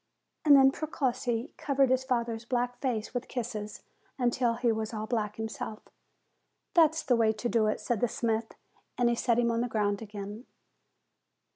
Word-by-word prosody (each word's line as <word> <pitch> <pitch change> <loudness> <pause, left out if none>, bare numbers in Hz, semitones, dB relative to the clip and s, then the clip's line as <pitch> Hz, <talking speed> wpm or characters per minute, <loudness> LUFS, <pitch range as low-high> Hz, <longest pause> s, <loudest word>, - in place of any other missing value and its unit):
And 290 -2 +8
then 270 -1 +7
Precossi 260 -4 -2
covered 275 -2 +2
his 260 0 +2
father's 235 -3 -1
black 245 0 -1
face 240 -5 -2
with 245 0 -3
kisses, 220 -4 -5 0.3
until 245 -2 +1
he 240 0 +1
was 220 0 -3
all 215 0 -3
black 215 -2 -2
himself. 220 -1 -5 0.9
"That's 320 -3 +4
the 250 - +3
way 225 -2 +3
to 215 +3 -3
do 230 -2 +2
it," 215 - 0
said 240 -3 -1
the 245 - +3
smith, 225 0 -2 0.4
and 245 -1 +3
he 235 - +2
set 235 0 +1
him 235 -1 +2
on 230 0 0
the 245 - 0
ground 205 -2 0
again. 205 +2 -7
235 Hz, 170 wpm, -29 LUFS, 220-250 Hz, 0.9 s, And